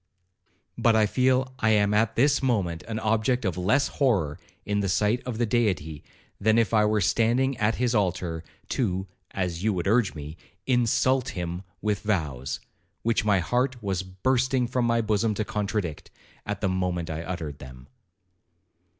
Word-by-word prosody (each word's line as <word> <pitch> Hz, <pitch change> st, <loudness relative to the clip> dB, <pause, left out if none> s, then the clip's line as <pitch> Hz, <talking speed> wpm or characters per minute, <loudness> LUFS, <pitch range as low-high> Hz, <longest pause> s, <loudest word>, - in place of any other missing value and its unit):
But 115 Hz, -1 st, +4 dB
I 110 Hz, -1 st, +5 dB
feel 130 Hz, +3 st, +1 dB
I 110 Hz, -, +2 dB
am 105 Hz, -1 st, +3 dB
at 110 Hz, +1 st, +2 dB
this 140 Hz, +4 st, +3 dB
moment 95 Hz, -, 0 dB
an 110 Hz, -1 st, -3 dB
object 110 Hz, +2 st, +1 dB
of 95 Hz, -, 0 dB
less 105 Hz, +11 st, +2 dB
horror 95 Hz, -, 0 dB, 0.3 s
in 105 Hz, 0 st, 0 dB
the 100 Hz, -1 st, 0 dB
sight 105 Hz, +6 st, +1 dB
of 120 Hz, -3 st, -3 dB
the 120 Hz, -, +1 dB
Deity, 95 Hz, -10 st, -1 dB, 0.4 s
than 110 Hz, +2 st, +3 dB
if 115 Hz, -4 st, +2 dB
I 105 Hz, -1 st, +5 dB
were 105 Hz, 0 st, +2 dB
standing 120 Hz, +7 st, +2 dB
at 105 Hz, +1 st, +2 dB
his 125 Hz, -1 st, 0 dB
altar, 90 Hz, -5 st, -1 dB, 0.3 s
to 95 Hz, -6 st, -1 dB, 0.2 s
(as 90 Hz, -2 st, -3 dB
you 110 Hz, -1 st, +2 dB
would 90 Hz, -2 st, -2 dB
urge 110 Hz, -1 st, +2 dB
me) 75 Hz, +2 st, -8 dB, 0.3 s
insult 125 Hz, +1 st, +2 dB
him 90 Hz, 0 st, -3 dB, 0.2 s
with 105 Hz, -2 st, 0 dB
vows, 75 Hz, -, -2 dB, 0.4 s
which 115 Hz, -1 st, +1 dB
my 105 Hz, -2 st, +4 dB
heart 125 Hz, +8 st, 0 dB
was 95 Hz, -3 st, -1 dB
bursting 125 Hz, +7 st, 0 dB
from 120 Hz, 0 st, 0 dB
my 115 Hz, 0 st, +2 dB
bosom 110 Hz, 0 st, +1 dB
to 110 Hz, -, -2 dB
contradict, 105 Hz, -6 st, -3 dB, 0.4 s
at 105 Hz, -1 st, -3 dB
the 100 Hz, -, +1 dB
moment 90 Hz, -2 st, -1 dB
I 80 Hz, +1 st, -4 dB
uttered 80 Hz, -5 st, -5 dB
them.' 65 Hz, -2 st, -11 dB
105 Hz, 165 wpm, -26 LUFS, 90-115 Hz, 0.4 s, I